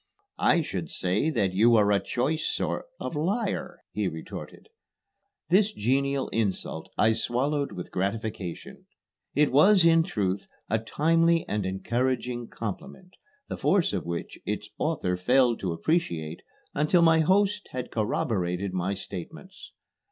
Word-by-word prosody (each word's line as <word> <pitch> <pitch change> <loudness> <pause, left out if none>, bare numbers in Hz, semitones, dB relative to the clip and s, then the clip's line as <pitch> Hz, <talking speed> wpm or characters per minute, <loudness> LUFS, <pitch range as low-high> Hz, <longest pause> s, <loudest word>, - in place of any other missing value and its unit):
"I - - +4
should - - -4
say 95 - 0
that 100 -11 0
you 115 +5 +5
are 105 -2 +4
a 100 - +4
choice 140 +6 -1
sort - - -2
of - - -4
liar," 185 +10 -2
he - - -1
retorted. - - -8 0.8
This 200 +4 +4
genial 135 - 0
insult 100 -7 -2
I 110 +1 +4
swallowed 135 +6 -1
with 90 - -7
gratification. 100 -2 -4 0.5
It 150 +1 +3
was, 180 +7 +6
in 165 0 +6
truth, 100 - -2 0.2
a 110 - +2
timely 165 +7 +2
and 105 -2 -1
encouraging 120 +5 -1
compliment, 180 - -7 0.4
the - - -5
force 185 - +2
of 90 -4 -3
which 85 0 -5
its - - -4
author 90 0 0
failed 120 +5 +3
to 95 - -2
appreciate 85 - -1 0.3
until 160 +4 +3
my 160 -1 +5
host 200 +5 +2
had 125 -1 -5
corroborated 100 -4 -1
my 95 +2 -1
statements. 160 - -9
120 Hz, 135 wpm, -27 LUFS, 100-160 Hz, 0.8 s, was